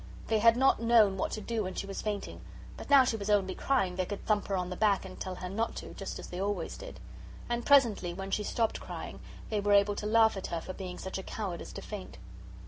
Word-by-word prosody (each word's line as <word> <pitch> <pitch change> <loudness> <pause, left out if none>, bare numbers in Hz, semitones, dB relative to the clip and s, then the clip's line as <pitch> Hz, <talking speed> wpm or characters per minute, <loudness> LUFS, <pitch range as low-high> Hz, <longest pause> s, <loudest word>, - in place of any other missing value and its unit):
They 220 -1 +3
had 230 +2 +6
not 265 -2 +4
known 225 -4 +5
what 190 - -1
to 215 - -3
do 225 +1 -2
when 185 -2 -4
she - - -3
was 195 0 -5
fainting, 205 -2 -4 0.3
but - - -9
now 280 -2 +8
she 240 -3 0
was 205 0 -5
only 200 -2 +2
crying 195 -10 0
they 185 - 0
could 205 - -6
thump 210 -2 +1
her 195 - 0
on 180 0 -3
the - - -3
back 200 -1 +2
and 185 - -10
tell 185 -1 -4
her 180 - -6
not 225 +5 -2
to, - - -7
just 195 - -6
as - - -8
they 180 +1 -4
always 195 -4 -2
did. - - -9 0.5
And 240 0 -2
presently, 235 -11 +4
when 195 +2 -6
she 210 - +1
stopped 225 +2 0
crying, - - -7 0.3
they 215 - +1
were 205 0 +2
able 200 0 +5
to 210 - -3
laugh 220 0 +5
at 195 - -4
her 170 - -2
for 185 - -7
being 180 -2 -6
such 190 0 -5
a - - -6
coward 190 -5 -4
as - - -8
to - - -7
faint. 205 -3 -8
205 Hz, 260 wpm, -30 LUFS, 190-225 Hz, 0.5 s, now